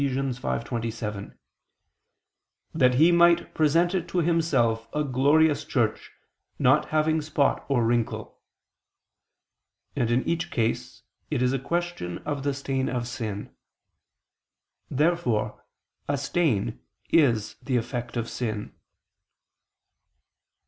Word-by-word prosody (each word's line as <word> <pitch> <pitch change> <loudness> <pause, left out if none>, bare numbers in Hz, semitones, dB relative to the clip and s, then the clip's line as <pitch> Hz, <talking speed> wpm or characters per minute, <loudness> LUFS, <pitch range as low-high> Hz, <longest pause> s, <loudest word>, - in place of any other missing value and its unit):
5:27): 115 - -3 1.4
"That 125 -5 +3
He 160 +6 +6
might 170 0 +4
present 165 +4 +3
it 180 -2 -1
to 175 - -4
Himself 150 -10 +1
a 150 - +1
glorious 145 +3 +3
church 120 -7 -1 0.5
not 135 +4 +4
having 155 +1 +2
spot 150 -2 +1
or 125 -4 +2
wrinkle": 120 -1 -1 1.5
and 120 - 0
in 120 +2 +2
each 170 0 -1
case 115 -1 -2 0.3
it 125 - 0
is 125 +1 +2
question 175 - -2
of 145 -2 -2
the 140 0 -1
stain 135 -1 -2
of 120 -2 -2
sin. 110 -5 -5 1.4
Therefore 130 -9 0 0.4
a - - 0
stain 130 - 0 0.3
is 120 -10 +3
the 130 0 0
effect 120 +1 -4
of 115 -1 -2
sin. 110 -4 -4
130 Hz, 105 wpm, -26 LUFS, 115-155 Hz, 1.5 s, He